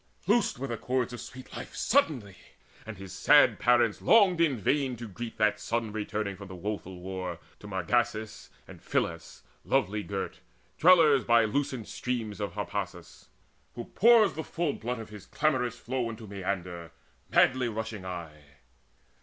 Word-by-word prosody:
Loosed 240 Hz, -, +2 dB
were 135 Hz, -, -4 dB
the 120 Hz, -4 st, -4 dB
cords 125 Hz, +2 st, -1 dB
of 120 Hz, -, -6 dB
sweet 130 Hz, 0 st, -10 dB
life -, -, -8 dB
suddenly, 130 Hz, -, +1 dB, 0.5 s
And 110 Hz, -3 st, -7 dB
his 95 Hz, -1 st, -9 dB
sad -, -, +5 dB
parents 120 Hz, -2 st, +3 dB
longed 195 Hz, -6 st, +5 dB
in 150 Hz, -6 st, +3 dB
vain 130 Hz, +4 st, 0 dB
to 120 Hz, 0 st, -8 dB
greet 115 Hz, +4 st, -7 dB
That 105 Hz, 0 st, +2 dB
son 115 Hz, 0 st, -2 dB
returning 105 Hz, -1 st, -3 dB
from 100 Hz, -, -10 dB
the 95 Hz, -, -9 dB
woeful 95 Hz, -1 st, -5 dB
war 90 Hz, -1 st, -5 dB, 0.2 s
To 105 Hz, -, -11 dB
Margasus 110 Hz, +3 st, -1 dB, 0.2 s
and -, -, -13 dB
Phyllis -, -, -3 dB, 0.2 s
lovely 105 Hz, +2 st, +1 dB
girt, 100 Hz, -1 st, -5 dB, 0.4 s
Dwellers 160 Hz, -6 st, +6 dB
by 115 Hz, -1 st, +4 dB
lucent 130 Hz, 0 st, -2 dB
streams 115 Hz, -5 st, -4 dB
of 100 Hz, -, -3 dB
Harpasus, -, -, -6 dB, 0.5 s
Who 120 Hz, -, -8 dB
pours 220 Hz, -4 st, +6 dB
the 160 Hz, +3 st, -5 dB
full 165 Hz, -2 st, -2 dB
blood 120 Hz, +2 st, -4 dB
of 110 Hz, -1 st, -8 dB
his 105 Hz, -2 st, -11 dB
clamorous 125 Hz, -6 st, 0 dB
flow 125 Hz, -1 st, -3 dB
Into 110 Hz, 0 st, -8 dB
Maeander 90 Hz, -4 st, -4 dB, 0.4 s
madly 125 Hz, -1 st, +3 dB
rushing 110 Hz, -2 st, -5 dB
aye. 80 Hz, -6 st, -8 dB
115 Hz, 155 wpm, -29 LUFS, 100-130 Hz, 0.5 s, Dwellers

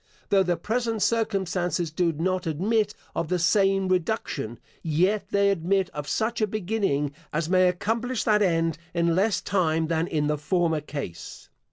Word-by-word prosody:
Though 195 Hz, -1 st, +4 dB
the 180 Hz, -2 st, +1 dB
present 225 Hz, -1 st, -1 dB
circumstances 185 Hz, -7 st, 0 dB
do 170 Hz, +1 st, +1 dB
not 180 Hz, +3 st, -1 dB
admit 205 Hz, +7 st, 0 dB, 0.2 s
of 170 Hz, -, -2 dB
the 180 Hz, -, 0 dB
same 195 Hz, +2 st, +3 dB
reduction, 175 Hz, -, -1 dB, 0.2 s
yet 180 Hz, +7 st, +1 dB
they 200 Hz, 0 st, +3 dB
admit 190 Hz, +1 st, 0 dB
of 145 Hz, -1 st, -6 dB
such 225 Hz, +1 st, -1 dB
a 215 Hz, -, +3 dB
beginning, 195 Hz, -8 st, -1 dB, 0.2 s
as 155 Hz, +1 st, -1 dB
may 185 Hz, -1 st, +5 dB
accomplish 225 Hz, +6 st, -1 dB
that 210 Hz, -2 st, +3 dB
end 165 Hz, -4 st, +1 dB, 0.2 s
in 170 Hz, -1 st, +2 dB
less 200 Hz, +1 st, +2 dB
time 160 Hz, -4 st, 0 dB
than 165 Hz, 0 st, 0 dB
in 150 Hz, -2 st, 0 dB
the 150 Hz, 0 st, 0 dB
former 160 Hz, 0 st, +1 dB
case. 140 Hz, -, -7 dB
180 Hz, 160 wpm, -26 LUFS, 160-205 Hz, 0.2 s, may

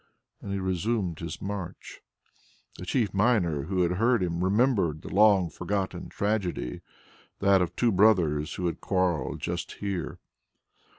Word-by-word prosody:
And 100 Hz, -, -6 dB
he 100 Hz, -, -1 dB
resumed 95 Hz, -1 st, -1 dB
his 85 Hz, -, -6 dB
march. 95 Hz, -3 st, -6 dB, 0.8 s
The 90 Hz, -, -8 dB
chief 115 Hz, -8 st, 0 dB
miner 95 Hz, -, +2 dB
who 90 Hz, +1 st, 0 dB
had 90 Hz, +1 st, 0 dB
heard 115 Hz, -3 st, +3 dB
him 85 Hz, 0 st, -1 dB
remembered 95 Hz, -, +1 dB
a -, -, -6 dB
long 100 Hz, -4 st, +4 dB
forgotten 95 Hz, 0 st, -3 dB
tragedy, 100 Hz, -, -2 dB, 0.6 s
that 100 Hz, -1 st, +4 dB
of 90 Hz, -, -2 dB
two 120 Hz, -2 st, +2 dB
brothers 90 Hz, -7 st, +3 dB
who 90 Hz, -, -3 dB
had 85 Hz, -, -2 dB
quarrelled 90 Hz, -7 st, 0 dB
just -, -, -4 dB
here. 100 Hz, -3 st, -4 dB
95 Hz, 140 wpm, -27 LUFS, 85-105 Hz, 0.8 s, long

